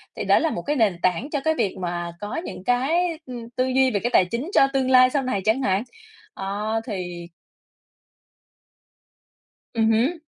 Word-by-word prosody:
thì - - -4
đó - - +5
là 325 - +1
một 175 - -4
cái 295 +11 -1
nền 215 -9 +2
tảng 185 - 0
cho 290 - -1
cái 315 - +3
việc 200 - -1
mà 175 -1 -3
có 205 - -5
những - - -8
cái, 310 - +1
ừ, 255 - -8 0.2
tư 255 - +1
duy 260 0 +3
về 205 - 0
cái 240 - -1
tài 185 - +5
chính 235 - -4
cho 270 - +6
tương 265 -1 +1
lai 255 0 +7
sau 275 +1 0
này 255 -7 -1
chẳng 220 +5 +2
hạn. 195 -4 +1 0.5
Đó 210 +3 -2
thì 175 -5 -5 2.5
Ừm 225 -1 +2
hứm. 250 +10 +1
230 Hz, 185 wpm, -23 LUFS, 195-265 Hz, 2.5 s, lai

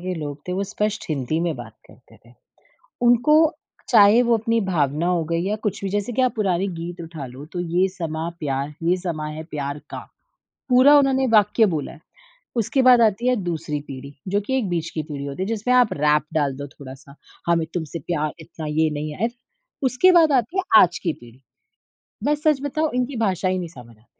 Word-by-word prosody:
के 185 +1 -3
लोग 145 -3 -5
थे - - -1
वो 195 +2 -1
स्पष्ट 210 +2 -2
हिंदी 150 +1 -1
में 170 -2 -1
बात 115 -3 -9
करते - - -20
थे। 120 - -18 0.7
उनको 245 +6 +5 0.5
चाहे 220 +1 +6
वो 230 -1 +4
अपनी 230 +1 0
भावना 155 -1 0
हो 175 -2 +1
गई 165 0 +1
या 210 - 0
कुछ 200 - -2
भी 195 - -1
जैसे 205 +4 -2
कि 260 - +1
आप 255 - +2
पुराने 195 -2 0
गीत 170 +1 -6
उठा 160 -4 -7
लो 130 +4 -10
तो 175 - -3
ये 175 +2 +1
समां 165 -2 -4
प्यार 140 0 -3
ये 180 +2 +2
समा 165 -4 -4
है 155 +1 -7
प्यार 145 0 -4
का, - - -6 0.7
पूरा 260 +4 +7
उन्होंने 265 -1 +2
वाक्य 210 +2 +4
बोला 150 -3 -3
है। - - -15 0.6
उसके 265 +6 +1
बाद 250 -2 +6
आती 225 +3 +2
है 250 - +3
दूसरी 160 -3 -3
पीढ़ी 140 +1 -9
जो 200 +2 0
कि 265 +6 -1
एक 210 -8 -1
बीच 165 -2 -2
की 155 - -4
पीढ़ी 145 -2 -6
होती 140 +6 -6
है - - -4
जिसमें 225 +3 0
आप 250 -3 +4
रैप 150 +1 +2
डाल 145 -3 +1
दो 140 0 -6
थोड़ा-सा 135 0 -13 0.3
हमें 165 -1 +2
तुमसे 165 -1 -4
प्यार 155 -3 -1
इतना 160 0 -9
ये 155 +1 +1
नहीं 150 0 -5
आया। 225 +4 0 0.6
उसके 310 +10 +4
बाद 330 -4 +5
आती 295 - -9
है 385 - +1 0.2
आज 175 -1 +2
की 165 -4 0
पीढ़ी। 120 +2 -17 0.9
मैं 295 - +3
सच 295 -2 +1
बताऊँ 310 +2 -1
इनकी 250 +1 -1
भाषा 185 -1 0
ही 185 0 0
नहीं 175 -2 -4
समझ 120 -2 -13
आती। 110 - -28
175 Hz, 210 wpm, -22 LUFS, 150-225 Hz, 0.9 s, पूरा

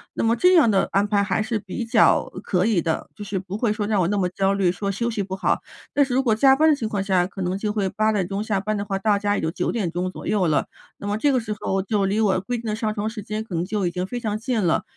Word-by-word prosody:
那 - - -2
么 230 +1 +3
这 360 +10 +4
样 305 -9 +6
的 195 -2 +2
安 200 +1 +2
排 205 -1 +2
还 210 - 0
是 220 +1 -1
比 210 +4 -5
较， 230 -1 +3
呃， 185 - -7
可 185 -2 0
以 215 -6 +2
的， 160 0 -2
就 210 - -8
是 195 -1 -3
不 190 +2 -6
会 225 -1 +1
说 210 -1 -2
让 210 -3 +2
我 170 - +2
那 205 - 0
么 185 -2 +1
焦 195 +2 0
虑， 195 -2 +2
说 195 +3 -2
休 235 +4 -1
息 220 -3 -2
不 190 0 -7
好。 190 - 0 0.3
但 285 - +4
是 265 -2 -2
如 260 - +3
果 235 -5 +2
加 265 +4 +5
班 315 +2 +4
的 305 - +5
情 225 -6 -4
况 205 -2 -1
下， 190 -2 +2
可 190 +1 -8
能 180 +1 -1
就 210 +1 -2
会 205 -2 0
8 215 +3 +1
点 195 -4 0
钟 195 +2 -3
下 210 -3 0
班 215 +2 -2
的 200 - -2
话， 195 -1 -3
到 205 0 +2
家 205 0 0
也 - - -2
就 160 - 0
9 165 - -2
点 205 -7 -1
钟 180 +2 -3
左 - - -9
右 205 -4 +2
了， 155 -3 +2 0.3
那 200 - -7
么 205 +1 0
这 285 +6 +2
个 260 - +2
时 215 -2 -4
候 - - -1
我 195 - +1
就 200 +1 0
离 200 +3 0
我 200 -4 +3
规 245 +5 -3
定 230 - -8
的 210 - -1
上 215 -1 -2
床 215 0 -2
时 220 -1 -7
间， 215 +1 -4
可 220 - -10
能 165 - 0
就 200 0 -1
已 - - -2
经 180 +1 -3
非 245 +4 -4
常 215 -3 -2
近 230 0 -1
了， 165 - +2
205 Hz, 345 characters per minute, -23 LUFS, 190-220 Hz, 0.3 s, 样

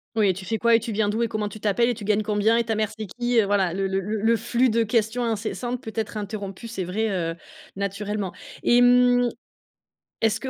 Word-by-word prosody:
Oui, 205 -4 +3
tu 190 +2 -8
fais 225 +4 -2
quoi? 235 +1 +3
Et - - +5
tu 230 0 -5
viens 210 0 +1
d'où? 215 +3 -1
Et 235 - +2
comment 215 -2 -2
tu 215 - -10
t'appelles? 215 +3 +2
Et - - +1
tu 220 -2 -9
gagnes 210 +1 +1
combien? 210 +2 +2
Et 235 - +2
ta 225 -1 -2
mère, 215 -1 0
c'est 215 - -4
qui? 240 +4 0
Heu, 215 - +4
voilà, 195 -3 +1
le 195 0 -1
le 190 0 0
le 210 +3 -3
le 230 +2 +4
flux 240 +3 +1
de 230 +1 +2
questions 225 +1 0
incessantes 235 +2 -3
peut 220 - -7
être 220 -1 -3
interrompu, 205 +1 -6
c'est 220 -4 -4
vrai, 215 +5 -1
heu, 165 -3 -2 0.4
naturellement 200 0 -3 0.3
et 240 0 +5
mmh, 245 0 +5 0.9
est-ce 225 0 +1
que 265 - -4
220 Hz, 240 wpm, -24 LUFS, 200-235 Hz, 0.9 s, Et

